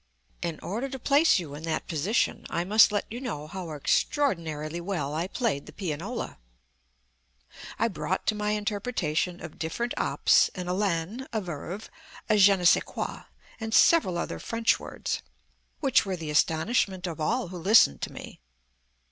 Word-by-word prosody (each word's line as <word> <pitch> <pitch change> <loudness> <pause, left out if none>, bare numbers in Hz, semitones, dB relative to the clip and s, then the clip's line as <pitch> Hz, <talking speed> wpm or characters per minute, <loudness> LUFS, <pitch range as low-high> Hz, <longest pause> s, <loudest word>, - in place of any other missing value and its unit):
In 170 -3 -3
order 230 +9 -3
to 265 - -5
place 285 +4 +4
you 165 -6 -5
in 145 - -7
that 165 - -2
position 175 +9 0
I 170 - -1
must 215 +4 +6
let 205 - -1
you 240 +3 -5
know 190 - -4
how 175 +2 -7
extraordinarily 160 - 0
well 170 -6 -3
I 165 +4 -1
played 205 - -2
the - - -9
pianola. 180 - -5 1.4
I 230 - +2
brought 185 -2 -3
to - - +2
my 210 0 -2
interpretation 205 -5 -1
of 170 - -11
different 200 +10 -2
Ops - - +3
an 180 - -4
élan, 190 +6 -1
a 220 - 0
verve, 180 +2 -6 0.4
a 215 - +3
je 200 0 +7
ne 180 - -5
sais - - +6
quoi - - -5 0.3
and 225 0 -2
several 250 - +5
other 85 - -3
French 230 - +1
words - - -4 0.6
which 270 -4 +4
were 195 -3 -3
the 160 -2 -5
astonishment 185 +5 +1
of 165 -3 -5
all 160 +3 0
who 180 - -7
listened 170 - +5
to - - -3
me. - - -10
185 Hz, 165 wpm, -27 LUFS, 160-220 Hz, 1.4 s, je